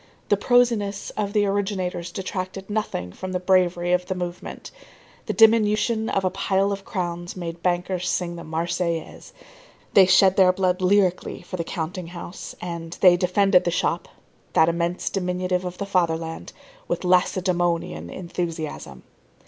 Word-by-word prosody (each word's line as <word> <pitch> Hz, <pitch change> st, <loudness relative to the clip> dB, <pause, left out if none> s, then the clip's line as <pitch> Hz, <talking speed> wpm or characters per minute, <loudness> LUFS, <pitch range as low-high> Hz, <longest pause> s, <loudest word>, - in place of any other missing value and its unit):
The 205 Hz, -, +5 dB
prosiness 220 Hz, -3 st, +1 dB
of 205 Hz, -2 st, -2 dB
the 205 Hz, -1 st, +2 dB
originators 190 Hz, -3 st, -2 dB
detracted 190 Hz, +1 st, -5 dB
nothing 205 Hz, -, -2 dB
from 185 Hz, -, -6 dB
the 180 Hz, -, 0 dB
bravery 180 Hz, -1 st, +2 dB
of 180 Hz, 0 st, +1 dB
the 185 Hz, -, -2 dB
movement. 180 Hz, -1 st, -6 dB, 0.6 s
The -, -, -1 dB
diminution 220 Hz, 0 st, +4 dB
of 195 Hz, -, 0 dB
a 185 Hz, -, +1 dB
pile 195 Hz, +1 st, +1 dB
of 200 Hz, 0 st, -4 dB
crowns 175 Hz, -4 st, -4 dB
made 170 Hz, -1 st, -6 dB
bankers 180 Hz, 0 st, -1 dB
sing 175 Hz, -1 st, -1 dB
the 170 Hz, -, -8 dB
Marseillaise. 165 Hz, +1 st, -3 dB, 0.6 s
They 190 Hz, -2 st, +7 dB
shed 190 Hz, 0 st, +5 dB
their 185 Hz, -2 st, +6 dB
blood 185 Hz, 0 st, 0 dB
lyrically 185 Hz, -2 st, +1 dB
for 180 Hz, -, -7 dB
the 170 Hz, -, -2 dB
counting 175 Hz, +1 st, -5 dB
house; 175 Hz, +1 st, -8 dB
and 170 Hz, -1 st, -6 dB
they 180 Hz, -2 st, +8 dB
defended 185 Hz, +1 st, +3 dB
the -, -, 0 dB
shop, 175 Hz, -, -1 dB, 0.5 s
that 160 Hz, -, +5 dB
immense 170 Hz, +1 st, -2 dB
diminutive 180 Hz, -1 st, -1 dB
of 180 Hz, 0 st, -5 dB
the 200 Hz, -, -3 dB
fatherland, 165 Hz, -4 st, -1 dB, 0.4 s
with -, -, -2 dB
Lacedæmonian 175 Hz, -, +1 dB
enthusiasm. 165 Hz, -, -5 dB
180 Hz, 150 wpm, -24 LUFS, 175-195 Hz, 0.6 s, they